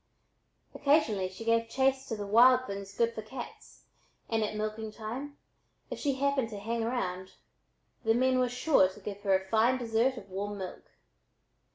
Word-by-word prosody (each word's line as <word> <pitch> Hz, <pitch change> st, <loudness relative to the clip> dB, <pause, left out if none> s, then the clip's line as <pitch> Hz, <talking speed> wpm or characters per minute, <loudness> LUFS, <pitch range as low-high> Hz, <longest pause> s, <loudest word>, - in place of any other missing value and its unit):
Occasionally 280 Hz, -10 st, +2 dB
she 190 Hz, +4 st, -10 dB
gave 230 Hz, 0 st, +2 dB
chase 270 Hz, +1 st, +1 dB
to 225 Hz, -, -3 dB
the 205 Hz, -1 st, -5 dB
wild 250 Hz, +5 st, +6 dB
things 200 Hz, -2 st, -6 dB
good 230 Hz, +1 st, +1 dB
for 220 Hz, -, -5 dB
cats, 240 Hz, +3 st, -10 dB, 0.5 s
and 225 Hz, -1 st, +2 dB
at 215 Hz, -, -3 dB
milking 215 Hz, +1 st, -3 dB
time, 245 Hz, +7 st, -6 dB, 0.5 s
if -, -, -4 dB
she 280 Hz, -3 st, 0 dB
happened 275 Hz, -3 st, 0 dB
to 210 Hz, -, -7 dB
"hang 225 Hz, +3 st, -2 dB
round," 190 Hz, -6 st, -3 dB, 0.7 s
the 225 Hz, -1 st, +3 dB
men 255 Hz, +1 st, +3 dB
were 250 Hz, -1 st, +2 dB
sure 245 Hz, -5 st, +3 dB
to 190 Hz, -, -13 dB
give 200 Hz, 0 st, -7 dB
her 195 Hz, -2 st, +3 dB
a 190 Hz, -, -10 dB
fine 230 Hz, +4 st, +3 dB
dessert 240 Hz, +2 st, +1 dB
of 195 Hz, -, -9 dB
warm 205 Hz, +2 st, -4 dB
milk. 190 Hz, -2 st, -7 dB
225 Hz, 175 wpm, -30 LUFS, 205-255 Hz, 0.7 s, wild